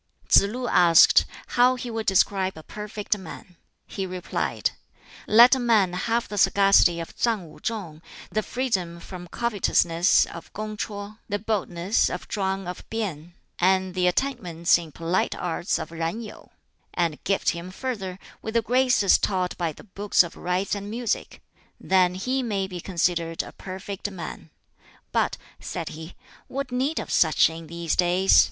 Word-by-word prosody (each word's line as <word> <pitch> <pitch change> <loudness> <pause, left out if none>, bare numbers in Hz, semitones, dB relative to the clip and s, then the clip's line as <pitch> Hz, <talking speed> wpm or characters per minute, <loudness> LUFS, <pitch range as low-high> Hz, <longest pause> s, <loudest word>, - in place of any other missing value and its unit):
Tsz - - +8
lu 245 +4 -4
asked 170 -5 +6 0.2
how 250 +1 +4
he 245 -1 -6
would 225 -1 -4
describe 190 -1 +2
a 160 - -10
perfect 210 +1 -3
man. 180 0 -11 0.3
He 195 -2 -4
replied, 180 0 -2 0.6
"Let 235 +4 +8
a 265 - +2
man 220 -7 +3
have 230 +6 -1
the 205 - -3
sagacity 195 -3 +5
of 165 - -7
Tsang 210 -9 -1
Wu - - -15
chung, 180 -9 -5 0.3
the 215 - 0
freedom 195 -9 -2
from 180 0 -9
covetousness 180 -5 +2
of 170 - -11
Kung 215 0 -5
ch'oh, 210 0 -6
the 205 - 0
boldness 200 -2 0
of - - -6
Chwang 195 -2 -2
of 180 - -6
P'in, 175 -7 -4 0.3
and 185 0 +2
the 180 -1 +1
attainments 180 -7 +1
in 165 -2 -9
polite 170 +4 -1
arts 175 +1 -1
of - - -6
Yen 165 +6 -2
Yu; 215 - -11 0.5
and 170 -4 -1
gift 195 0 +1
him 170 +1 -7
further 195 -4 -4 0.2
with 220 +1 -6
the 230 - +3
graces 245 -4 +4
taught 185 -2 -1
by 170 -2 -2
the - - -14
'Books 205 -1 +2
of 170 - -8
Rites' 180 +2 -1
and 200 0 -4
'Music' 235 0 -3 0.4
then 185 -1 +2
he 255 +8 -1
may 205 -6 -1
be 180 -2 -7
considered 170 -2 -1
a - - -10
perfect 195 +1 -6
man. 170 -4 -8 0.6
But," - - +1 0.2
said - - -5
he, 160 +2 -9 0.3
"what 275 -1 -4
need 265 +6 -1
of - - -6
such 160 -1 +4
in 165 0 -9
these 170 0 -2
days? 180 +2 +4
190 Hz, 160 wpm, -25 LUFS, 175-215 Hz, 0.6 s, Tsz